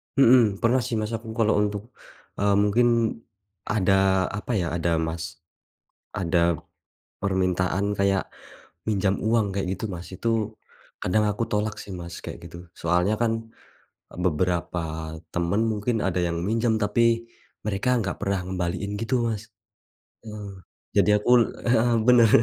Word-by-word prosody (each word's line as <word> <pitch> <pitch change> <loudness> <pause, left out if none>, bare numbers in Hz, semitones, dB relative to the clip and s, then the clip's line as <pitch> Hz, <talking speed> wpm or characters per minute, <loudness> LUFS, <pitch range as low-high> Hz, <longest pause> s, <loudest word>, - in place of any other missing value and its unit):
Mhm, 120 -6 +5
pernah 120 +3 +4
sih 115 0 -2
Mas 110 +1 -3
aku 115 0 -5
kalau 110 -2 +3
untuk, 105 -1 -1 0.6
eee, 100 0 +3
mungkin 115 +4 +3 0.8
ada 95 -2 +3
apa 105 - -5
ya, 90 -5 0
ada 85 0 0 0.2
Mas, 80 0 -4 0.9
ada 85 -2 +2 0.6
permintaan 95 -1 +1
kayak, 100 -1 +1 0.6
pinjam 100 -2 +1
uang 110 0 +2
kayak 100 -2 -1
gitu - - -9
Mas. 85 0 -7
Itu, 115 +5 -2 0.7
kadang 105 +4 +2
aku 105 +3 -2
tolak 105 0 -1
sih - - -12
Mas, 85 -1 -7
kayak - - -6
gitu. 85 - -10 0.2
Soalnya 90 +5 +2
kan, 115 -1 +3 0.9
beberapa 90 +1 0 0.5
teman 85 +4 +1
mungkin 110 +2 -1
ada 95 -2 0
yang 85 -1 -1
minjem, 115 +2 +1
tapi 105 +3 +2 0.6
mereka 105 +3 -1
nggak 95 -4 -2
pernah 100 -1 0
ngembaliin 95 +2 -2
gitu, 115 +4 -1
Mas. 110 -3 -2 0.8
Mhm. 105 -3 -8 0.4
Jadi - - +5
aku 105 +3 -1 0.3
heeh, 120 0 +3
benar. 120 -2 +7
100 Hz, 135 wpm, -25 LUFS, 90-110 Hz, 0.9 s, benar